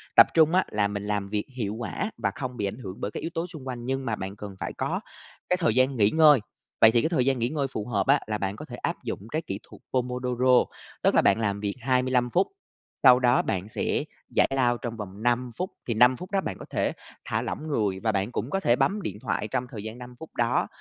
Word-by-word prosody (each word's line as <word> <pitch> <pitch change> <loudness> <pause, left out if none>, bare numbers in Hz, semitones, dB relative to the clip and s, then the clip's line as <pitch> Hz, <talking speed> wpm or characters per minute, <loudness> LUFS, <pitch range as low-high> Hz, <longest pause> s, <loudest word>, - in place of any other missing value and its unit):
Tập - - +9
trung 160 0 +5
á 185 +1 +4
là 105 -1 +2
mình 100 0 -4
làm 105 -1 -2
việc 105 0 -1
hiệu 105 -3 -2
quả 120 - -3
và - - 0
không 125 -2 -5
bị 105 - -1
ảnh 100 - -5
hưởng 95 -6 -8
bởi 105 - -2
các - - -5
yếu 165 - -3
tố 165 +2 -2
xung 155 -7 -10
quanh, 120 -2 -5
nhưng 135 +1 -2
mà 115 - 0
bạn 95 0 -6
cần 105 -1 -8
phải - - -4
có - - -2 0.5
cái 180 - +3
thời 160 -11 +1
gian 130 +1 +3
nghỉ 105 -2 +5
ngơi. 150 0 +6 0.4
Vậy 110 - +9
thì 120 0 +4
cái 160 - +1
thời 135 -8 +2
gian 135 -2 +2
nghỉ 120 +1 +1
ngơi 145 -2 -1
phù 110 -5 -5
hợp 100 -5 0
á, 140 +1 +5
là 105 -1 -1
bạn 100 0 -2
có - - -8
thể - - -8
áp - - -3
dụng - - -3
cái 155 - 0
kỹ 100 -10 -5
thuật - - -15
Pomodoro, 125 0 +2 0.4
tức - - +4
là - - +6
bạn - - +4
làm 100 -2 0
việc 100 -1 -2
25 125 0 +2
phút, 185 +9 +2 0.6
sau 125 0 +8
đó 125 +1 +4
bạn 95 +2 -3
sẽ - - -1 0.3
giải - - +5
lao 120 -2 +2
trong 115 -1 -5
vòng 100 0 -7
5 120 0 +1
phút. 185 +1 -2 0.2
Thì 115 - +1
5 125 +3 +5
phút 180 +1 -9
đó 195 -1 +2
bạn - - -4
có - - -8
thể - - 0 0.3
thả - - -1
lỏng 155 - -4
người, 105 -10 0
và 110 0 +1
bạn 100 +3 -1
cũng 120 +1 -3
có 195 - 0
thể 120 -11 +3
bấm 205 +10 +1
điện 165 - -4
thoại 105 - -1
trong 125 +4 -2
thời 105 -5 -6
gian 110 +2 -6
5 125 0 -10
phút 160 - -11
đó. 120 0 +1
120 Hz, 265 wpm, -26 LUFS, 105-135 Hz, 0.6 s, Tập